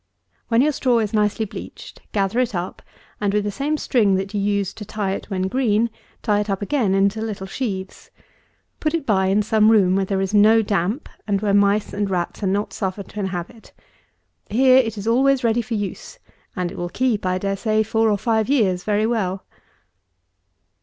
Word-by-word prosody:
When 235 +2 +3
your 305 - +3
straw 255 -4 +1
is 215 -2 -1
nicely 210 +1 +1
bleached, 200 - -10
gather 200 +3 0
it 250 -4 0
up, 175 +1 -4 0.4
and 205 -1 0
with 210 - +2
the 205 - -2
same 290 +7 -1
string 215 -9 +2
that 195 +2 -3
you 205 - -1
used 200 -1 -1
to - - -5
tie 210 -1 -3
it 195 - -5
when 190 -2 -2
green, 230 0 +1 0.3
tie 210 -3 +2
it 210 0 -3
up 195 +1 -1
again 215 -5 +1
into 200 +2 +1
little 210 -3 -4
sheaves. 190 -3 -5 0.7
Put 310 +1 0
it 320 -4 -3
by 190 -5 +2
in 200 +2 +2
some 215 0 +3
room 195 -5 +4
where 195 0 +1
there 195 0 -1
is 195 +1 -2
no 215 +2 +5
damp, 205 - -1 0.2
and 200 -1 +1
where 205 -1 0
mice 200 +1 +2
and 205 0 -1
rats 175 -2 -2
are 200 - 0
not 200 +2 -1
suffered 195 0 -4
to 210 - -8
inhabit. 190 +3 -5 0.8
Here 255 +3 +5
it 225 -4 +1
is 200 - -6
always 265 +3 +3
ready 230 0 +2
for 230 0 -4
use, 205 - -5 0.4
and 180 -3 -2
it 195 - -8
will 175 0 -3
keep, 235 +1 0
I 185 0 0
dare 195 +1 -2
say, 215 +2 +1
four 220 +1 +1
or 205 - +2
five 220 +1 0
years 195 -10 +2
very 210 0 +1
well. 195 -5 -1
210 Hz, 200 wpm, -21 LUFS, 195-225 Hz, 0.8 s, no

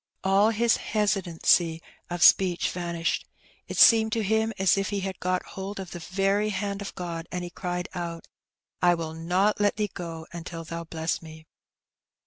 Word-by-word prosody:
All 195 +3 +4
his 230 +1 +2
hesitancy 175 -5 +1 0.3
of 175 -1 -1
speech 180 -3 +5
vanished. 170 -2 -2 0.4
It - - -6
seemed 220 -1 +7
to 225 - 0
him 220 +2 +1
as 190 -2 +4
if 195 -1 -1
he 200 -1 -2
had 190 -1 -4
got 185 0 0
hold 195 +1 -6
of 190 -2 -7
the 175 - -6
very 195 +5 0
hand 200 0 -3
of 200 - -7
God, 170 -2 -5
and 180 0 -3
he 175 - -6
cried 180 -1 -4
out, 170 -2 -5 0.5
'^I 175 -1 +4
will 160 -1 -4
not 180 +6 +1
let 205 - +3
Thee 210 -3 -2
go 165 -2 -6
until 170 -1 -7
Thou 170 +1 -6
bless 160 0 -2
me." 160 -1 -12
180 Hz, 175 wpm, -26 LUFS, 170-200 Hz, 0.5 s, seemed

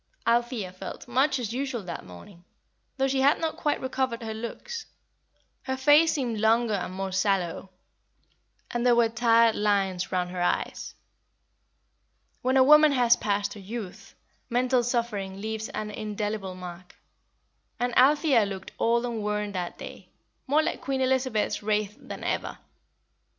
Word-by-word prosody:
Althea 235 -4 0
felt 185 +5 -8
much 265 +3 +2
as 230 -3 -4
usual 260 -4 -3
that 175 -2 -6
morning, 170 - -13 0.5
though 270 0 +2
she 270 0 0
had 280 +3 +4
not 325 -1 -2
quite 295 - -1
recovered 260 -2 -2
her 220 -1 -4
looks. 440 - -6 0.7
Her 265 0 -3
face 295 +4 +5
seemed 240 -6 -2
longer 225 +1 +3
and 185 -2 -2
more 190 +1 -4
sallow, 190 -1 0 1.0
and 240 0 -1
there 245 -1 +5
were 235 -1 +4
tired 230 0 +4
lines 195 -3 0
round 180 -1 -1
her 180 -1 -4
eyes. 175 - -2 1.5
When 260 +1 +2
a 260 - +7
woman 300 +1 +7
has 245 -3 +5
passed 205 0 -1
her 210 - -10
youth, 200 -1 -8 0.3
mental 250 +1 +2
suffering 230 -6 -2
leaves 220 +3 -4
an 215 -6 -5
indelible 210 -2 -4
mark; 180 -1 -10 0.8
and 245 0 -1
Althea 275 -2 +5
looked 195 -1 -6
old 235 +1 +2
and 235 -3 -3
worn 210 0 -2
that 180 -3 -4
day, - - -8
and - - -17 0.4
more 300 +3 +3
like - - -3
Queen 270 -1 -2
Elizabeth's 260 -4 0
Wraith 210 -1 -1
than - - -8
ever. - - -2
230 Hz, 150 wpm, -27 LUFS, 200-260 Hz, 1.5 s, a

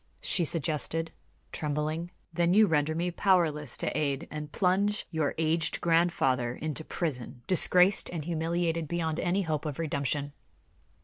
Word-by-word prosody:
she 175 - +2
suggested, 165 +1 -1 0.4
trembling. 155 +3 -2 0.2
"Then 175 +2 +2
you 215 +1 +7
render 155 -3 +1
me 175 +2 -1
powerless 165 -7 +1
to - - -1
aid, 140 -2 -1
and 150 -1 -6
plunge 200 +3 +1
your 160 -4 -1
aged 160 0 0
grandfather 135 -8 +1
into 155 0 -4
prison, 125 -8 -4
disgraced 185 +2 +5
and 160 -4 -5
humiliated 165 0 -1
beyond 160 -1 -2
any 185 +3 0
hope 155 -3 -2
of 150 -4 -4
redemption." 145 -2 -1
160 Hz, 135 wpm, -29 LUFS, 150-175 Hz, 0.4 s, you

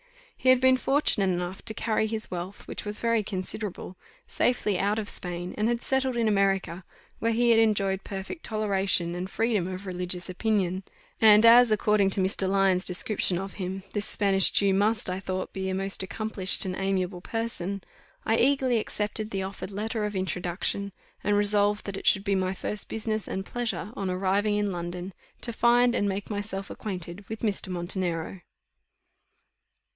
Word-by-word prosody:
He 260 - +1
had 255 -1 +7
been 260 0 +5
fortunate 255 -8 +2
enough 180 +1 -4
to 220 - -2
carry 220 -1 0
his 220 0 -4
wealth, 180 +2 -6
which - - -5
was 210 0 -1
very 230 -1 +2
considerable, 190 -1 -5 0.3
safely 210 -6 0
out 205 +2 +1
of 215 -2 -3
Spain, 175 -1 -2
and 215 +1 0
had 235 0 -1
settled 265 -2 0
in 230 -1 +2
America, 195 -3 +1 0.4
where 230 - +1
he 240 +1 +3
had 225 - +5
enjoyed 200 -3 +2
perfect 195 - -6
toleration 195 -5 +1
and 180 +2 -4
freedom 215 -4 0
of 185 +1 -6
religious 180 -1 -4
opinion; 190 -1 0 0.4
and 215 0 +7
as, 240 +1 +8
according 210 -2 +3
to 195 - +1
Mr. 190 0 +1
Lyons' 190 -2 +2
description 185 0 +1
of 195 +2 -5
him, 190 0 -5
this 205 -1 0
Spanish 195 -2 +3
Jew 200 -1 +3
must, 210 +3 +2
I 185 0 -2
thought, 185 -1 -4
be 190 0 -3
a 190 - -1
most 195 +1 -2
accomplished 195 -1 +2
and 185 -1 -3
amiable 190 -2 -1
person, 200 -4 -3 0.4
I 225 - +2
eagerly 260 -2 +3
accepted 210 0 -3
the 195 -3 -2
offered 190 0 -6
letter 215 +2 -3
of 210 -1 -4
introduction, 185 +2 -2 0.3
and 205 0 +2
resolved 205 0 +2
that 200 -1 -4
it - - -5
should 195 - +5
be 200 - 0
my 190 0 0
first 210 +2 -4
business 220 -1 -2
and 190 0 -4
pleasure, 235 -3 -3
on 195 -2 -3
arriving 195 +3 +1
in 205 -1 0
London, 175 +1 -5 0.3
to 235 - -1
find 240 +1 +4
and 205 -4 +1
make 195 +2 -4
myself 205 -1 -4
acquainted 185 -1 -6
with 220 0 -6
Mr. 210 -4 -1
Montenero. 175 -1 -3
200 Hz, 175 wpm, -27 LUFS, 185-220 Hz, 0.4 s, as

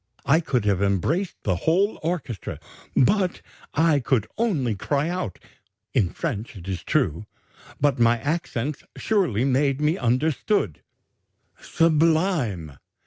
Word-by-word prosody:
I 155 +3 +4
could 125 -9 -1
have 100 -2 +2
embraced 125 - 0
the 95 -3 +1
whole 190 - +1
orchestra, 155 - -4 0.4
but 185 - +2 0.3
I 160 -1 +4
could 120 -3 +1
only 160 - 0
cry 140 - -1
out, 175 - -3 0.6
in 95 - +2
French 120 - -4
it 95 -2 -10
is 95 -3 -3
true, 85 +8 0 0.5
but 145 -3 +2
my 115 0 +4
accents 145 -2 -2
surely 175 - +1
made 135 +1 +2
me 150 +4 +1
understood: 130 - 0 0.8
'Sublime! 155 - +1
140 Hz, 120 wpm, -24 LUFS, 105-165 Hz, 0.8 s, I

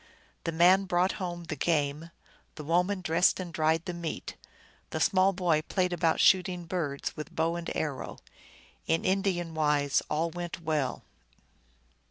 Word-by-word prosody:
The 165 - 0
man 180 +4 +5
brought 180 0 +2
home 175 -1 -4
the 160 - -5
game, 150 +1 0 0.5
the 155 - -7
woman 180 +5 +1
dressed 175 +2 +3
and 175 -2 -6
dried 160 +1 +1
the 180 - -3
meat, 170 -2 -5 0.5
the - - -3
small 190 0 +4
boy 175 -5 +1
played 180 +2 -1
about 165 -2 +1
shooting 180 -2 +3
birds 160 -5 -3
with 150 - -8
bow 165 +1 +1
and 170 -1 -4
arrow; 145 -5 -3 0.7
in 165 0 +1
Indian 185 -3 0
wise 150 -3 +2
all 165 +2 0
went 175 0 -5
well. 155 -5 -2
170 Hz, 150 wpm, -29 LUFS, 155-180 Hz, 0.7 s, man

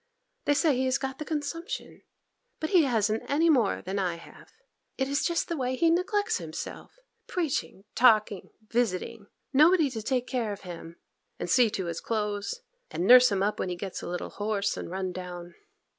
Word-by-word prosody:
They 290 - +3
say 300 -2 +3
he 260 +1 0
has 260 0 +2
got 265 0 -5
the 305 - -4
consumption, 330 - -5 0.6
but 315 - -3
he 350 -6 +5
hasn't 220 -3 +1
any 320 +4 +4
more 240 -9 +2
than 195 +2 -3
I 180 -3 0
have. 170 - -14 0.5
It 265 - 0
is 280 +1 0
just 340 -1 0
the 340 - -2
way 260 -3 -1
he 330 +4 +3
neglects 410 +5 +1
himself!—preaching, 350 - -5
talking, 215 -5 +3
and 215 - -30
visiting—nobody 245 - +1
to 225 -3 -4
take 250 +2 -1
care 240 -5 -2
of 200 - -7
him, 170 -2 -9 0.4
and - - -4
see 245 -3 +5
to 190 -3 -3
his 170 -1 -4
clothes, 210 - -2 0.3
and 175 - -2
nurse 250 +1 +8
him 195 -1 +1
up 210 +1 -1
when 185 - -1
he 180 - -2
gets 190 +1 -6
a - - -6
little 175 0 -4
hoarse 205 -1 -1
and - - -6
run 185 0 -3
down. 175 -1 -8
240 Hz, 185 wpm, -28 LUFS, 200-300 Hz, 0.6 s, nurse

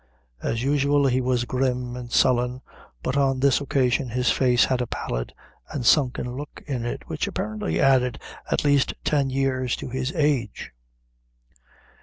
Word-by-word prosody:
As 115 +1 -2
usual, 140 +1 +2
he 130 -1 +2
was 125 -1 0
grim 125 -1 -1
and 120 -1 -8
sullen, 125 0 +2 0.4
but 130 - -1
on 135 -2 +2
this 140 +1 +3
occasion 130 -3 +1
his 125 +1 +1
face 125 -2 +3
had 130 -1 0
a 125 - -2
pallid - - -4 0.4
and 140 -6 -4
sunken 125 -3 +2
look 145 +2 -8
in 130 -5 -3
it, - - -5
which - - -2
apparently 105 -6 -3
added 130 -3 +3 0.3
at - - +1
least 145 -2 +3
ten 140 -3 +1
years 130 -2 0
to - - -7
his 130 +2 -2
age. 145 -8 0
130 Hz, 155 wpm, -24 LUFS, 125-135 Hz, 0.4 s, this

